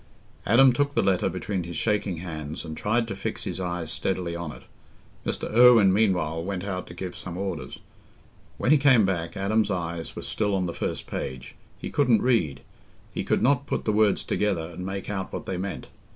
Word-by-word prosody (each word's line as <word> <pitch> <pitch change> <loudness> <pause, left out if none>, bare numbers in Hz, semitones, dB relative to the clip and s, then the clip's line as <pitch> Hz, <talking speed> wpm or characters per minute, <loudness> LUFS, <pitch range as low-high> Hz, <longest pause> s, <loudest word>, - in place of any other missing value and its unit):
Adam 125 +4 +6
took 145 +2 0
the - - +3
letter 95 -1 +2
between 100 -3 -3
his 85 0 -7
shaking 105 -1 0
hands 80 -2 -6
and 80 -1 -6
tried 115 +6 0
to 100 - -4
fix 110 +3 -4
his 90 0 -4
eyes 85 -3 -3
steadily 85 +1 -2
on 85 -3 -4
it. - - -12 0.6
Mr. - - -2
Irwine 115 -5 +7
meanwhile 90 -6 +1
went 95 0 -3
out 95 -2 -4
to - - -10
give 90 -2 -5
some 90 -1 -7
orders. 90 -9 -4 0.8
When 125 - +1
he 155 - +6
came 130 -7 +6
back, 85 -1 -2
Adam's 105 +2 +1
eyes 85 -3 -3
were - - -6
still 105 -2 -1
on 95 -1 0
the 85 - -3
first - - -3
page—he 65 -1 -7
couldn't 125 -7 +3
read—he 95 - -2
could - - +1
not 140 +1 +3
put - - -2
the 110 - +1
words 105 -1 +3
together 95 -6 -1
and 90 +2 -7
make 95 0 -4
out 95 -2 -3
what - - -5
they 95 - -3
meant. 95 +1 -4
95 Hz, 195 wpm, -26 LUFS, 85-110 Hz, 0.8 s, Irwine